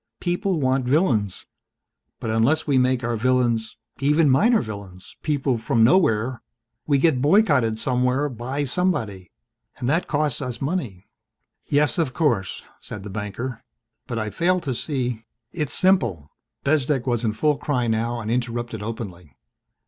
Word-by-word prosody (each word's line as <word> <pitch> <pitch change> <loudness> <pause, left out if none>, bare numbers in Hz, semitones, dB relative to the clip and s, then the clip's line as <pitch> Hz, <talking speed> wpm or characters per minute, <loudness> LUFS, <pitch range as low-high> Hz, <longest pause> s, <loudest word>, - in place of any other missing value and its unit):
People 180 0 -1
want 130 -2 +1
villains. 125 - +1 0.7
But 110 - -3
unless 120 +8 +2
we 140 -3 +3
make 130 0 +1
our 120 0 -1
villains 120 -1 +1 0.2
even 150 +2 +3
minor 225 - +4
villains 100 -4 -8
people 140 -5 0
from 115 0 +2
nowhere 120 - +3 0.5
we 145 -2 +3
get 135 -3 +2
boycotted 145 - +3
somewhere 125 +4 +1
by 130 +3 -3
somebody. 115 - -2 0.5
And 120 - -3
that 165 +6 +1
costs 150 -3 0
us 125 -3 -4
money." 135 - -3 0.6
"Yes, 145 +1 +2
of 145 -6 -1
course," 120 - 0 0.2
said 100 - -9
the 105 - -7
banker, 110 +4 -5 0.5
"but 120 -3 -4
I 110 -1 -2
fail 180 - +1
to 140 -6 -2
see 125 -4 -3 0.2
" 115 0 -58
"It's 150 -5 -3
simple." 115 - +2 0.3
Bezdek 140 -3 +1
was 120 -2 0
in 110 -2 0
full 145 +6 +1
cry 125 -5 0
now 115 +1 -1
and 110 0 -3
interrupted 120 -2 -2
openly. 90 - -7
125 Hz, 150 wpm, -23 LUFS, 110-145 Hz, 0.7 s, minor